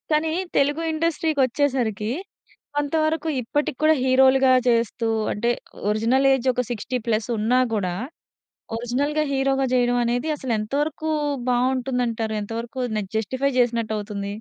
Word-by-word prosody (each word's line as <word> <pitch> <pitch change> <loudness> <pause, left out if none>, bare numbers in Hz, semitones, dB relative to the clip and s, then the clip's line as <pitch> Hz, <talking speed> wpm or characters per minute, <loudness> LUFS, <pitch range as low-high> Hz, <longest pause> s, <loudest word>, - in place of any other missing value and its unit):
కానీ 310 +1 +2 0.2
తెలుగు 290 +4 +2
ఇండస్ట్రీ 325 0 0
కొచ్చేసరికి 245 -5 0 0.7
కొంతవరకు 310 +2 0
ఇప్పటికి 290 +3 -2
కూడా 315 0 +6
హీరోలుగా 260 0 +5
చేస్తూ 230 -1 +1 0.3
అంటే 235 +4 -1 0.4
ఒరిజినల్ 230 +6 +2
ఏజ్ 265 -1 -1
ఒక 250 - 0
60+ 230 0 -2
ఉన్నా 235 +4 +2 0.2
కూడా 185 -4 -1 0.8
ఒరిజినల్‌గా 280 +6 -1
హీరోగా 270 0 +1
చేయడమనేది 245 +2 +1
అసలు 260 -4 -3
ఎంతవరకు 295 +7 -2 0.4
బాగుంటుందంటారు? 245 -3 0
ఎంతవరకు 230 +4 -5 0.2
నే 210 - 0
జస్టిఫై 260 +5 0
చేసినట్టు 230 -2 0
అవుతుంది? 205 -1 -5
255 Hz, 110 wpm, -23 LUFS, 230-280 Hz, 0.8 s, కూడా